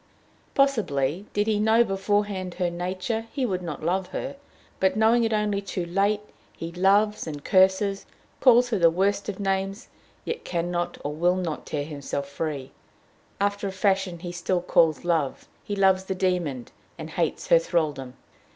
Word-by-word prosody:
Possibly, 190 - +1
did 205 0 +1
he 215 -1 +1
know 220 +2 +5
beforehand 195 -2 -1
her 180 -2 0
nature, 185 +6 -3
he 270 -3 -1
would 185 -5 -1
not 165 -4 -6
love 180 +3 0
her, 275 +8 -5 0.4
but, 190 0 +2
knowing 225 +2 +4
it 225 - +1
only 210 -2 0
too 185 -2 -4
late, 200 +4 +1 0.4
he 165 0 -5
loves 200 +4 +2
and 145 -2 -6
curses; 190 +1 +3 0.3
calls 245 -1 +5
her 215 - +1
the 170 -1 +6
worst 200 +4 0
of 200 - -5
names, 195 +1 -2 0.4
yet 470 - -4
can 175 0 -2
not 175 0 -2
or 145 - -3
will 175 +4 +2
not 175 -5 -4
tear 145 -1 -2
himself 140 -2 -4
free; 140 -2 -4 0.7
after 200 0 0
a - - -3
fashion 190 -2 0
he 175 +1 -6
still 175 0 -1
calls 165 -2 +3
love, 160 -6 0 0.2
he 205 - -3
loves 190 -1 +3
the 190 - -3
demon, 175 -9 -1 0.3
and 160 -1 -7
hates 165 -1 -2
her 170 - +7
thralldom. 150 -6 -1
185 Hz, 170 wpm, -25 LUFS, 170-205 Hz, 0.7 s, her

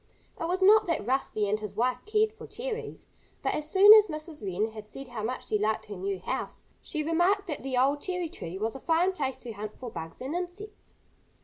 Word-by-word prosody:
It - - -2
was 370 +2 0
not 420 +2 +7
that 325 -12 -1
Rusty 240 -4 0
and 210 +2 0
his 210 -2 -6
wife 250 +3 +1
cared 430 0 +2
for 440 - -11
cherries. 475 -1 -5 0.4
But - - +1
as 305 0 -2
soon 400 +4 +9
as 430 -1 +8
Mrs. 310 -2 -6
Wren 200 +3 -1
had 215 -1 -9
said 270 +1 -7
how 235 -3 -5
much 245 +4 -3
she 215 - +1
liked 215 +1 0
her 205 - -7
new 195 +1 -2
house, 185 - -4 0.2
she 310 -3 -3
remarked 350 +6 +2
that 305 -6 -4
the 265 -2 -2
old 280 +3 +3
cherry 360 -2 -2
tree 190 - -7
was 220 +4 -2
a - - -6
fine 335 +6 +2
place 275 -8 -3
to 240 - -8
hunt 210 0 -6
for 245 -3 -6
bugs 160 -5 -7
and 265 +4 -4
insects. 365 +4 -6
275 Hz, 225 wpm, -28 LUFS, 215-360 Hz, 0.4 s, soon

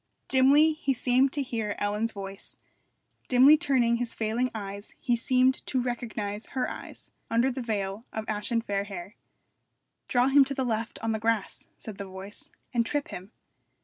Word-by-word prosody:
Dimly 280 +4 +6
he 285 -4 -1
seemed 255 +2 +3
to 285 - 0
hear 225 -5 -3
Ellen's 210 +3 0
voice; 195 -1 -7 0.7
dimly 265 +4 +7
turning 260 -7 +2
his 240 -1 -3
failing 230 +3 0
eyes 200 -1 -6
he 240 - +1
seemed 255 +2 +2
to 260 - +1
recognise 225 -4 -3
her 255 - +1
eyes - - -8 0.2
under 235 +4 +2
the 260 +1 -4
veil 205 -2 -3
of 220 0 -4
ashen 220 +2 0
fair 200 -2 -1
hair. 195 -1 -8 0.9
'Draw 250 +1 +3
him 275 +1 +7
to 275 +1 -4
the 265 - -1
left 225 -1 -2
on 225 - +1
the 220 - -1
grass,' 225 -2 -1
said 210 -3 -9
the 200 - -4
voice, 190 +2 -7 0.2
'and 235 -1 +3
trip 290 +4 -2
him.' 185 +4 -8
230 Hz, 170 wpm, -28 LUFS, 210-255 Hz, 0.9 s, dimly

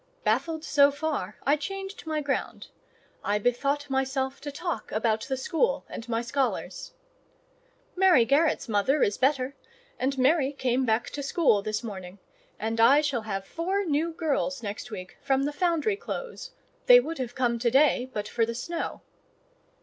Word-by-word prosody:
Baffled 320 -1 0
so 285 -3 +5
far, 285 - -3
I 285 - +4
changed 385 +4 -6
my 310 -1 -1
ground. 280 -2 -3 0.5
I 205 +1 +1
bethought 275 +6 0
myself 265 0 -1
to 290 - -5
talk 340 +4 -4
about 220 0 +1
the 265 -2 -2
school 370 - 0
and 230 +1 -8
my 230 0 0
scholars. 275 - -2 1.0
"Mary 360 -10 +5
Garrett's 295 +5 +2
mother 225 +7 +2
is 200 - 0
better, 265 0 +1 0.4
and 270 +1 0
Mary 275 +1 +3
came 260 -1 0
back 225 +2 +1
to - - -7
the - - -2
school 275 - +3
this 215 +2 -3
morning, 190 -4 -7 0.4
and 225 +1 -3
I 275 +6 +7
shall 280 -6 -1
have 195 -1 -3
four 380 - -2
new 320 +1 0
girls 280 -5 -1
next 205 +2 -5
week 185 -5 -8
from 270 -1 +1
the 290 +1 -1
Foundry 355 +5 +1
Close—they - - +1
would 330 - -4
have 245 -2 -4
come 240 -2 +1
to 235 0 +2
day 260 -1 +3
but 210 -2 -4
for 235 - 0
the 230 +1 -1
snow." 335 +8 -4
275 Hz, 165 wpm, -27 LUFS, 235-315 Hz, 1.0 s, I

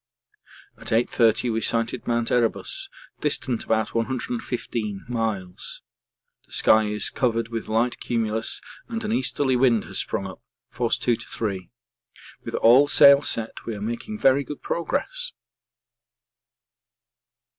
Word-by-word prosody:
At - - -12
8.30 115 0 +2
we 115 - -1
sighted 115 +2 -1
Mount 120 -1 0
Erebus, 120 -2 0 0.3
distant 120 -3 0
about 110 -1 0
115 115 -3 -3
miles; 110 -6 -3 0.6
the - - -27
sky 110 0 +4
is 105 -1 -2
covered 115 -2 0
with 115 -1 -4
light 115 +3 0
cumulus 110 -2 -1 0.3
and 230 -2 -4
an 215 - -2
easterly 130 - +1
wind 120 -3 +3
has - - -4
sprung - - -2
up, - - -9 0.3
force - - 0
2 120 -2 +1
to 120 - -10
3. 95 -5 -4 0.7
With - - -5
all 125 +5 +6
sail 140 -1 +7
set 115 -5 -2
we 115 - -3
are - - -7
making 120 - -4
very 135 -6 +4
good 145 +1 -8
progress. - - -2
115 Hz, 130 wpm, -24 LUFS, 110-130 Hz, 0.7 s, sail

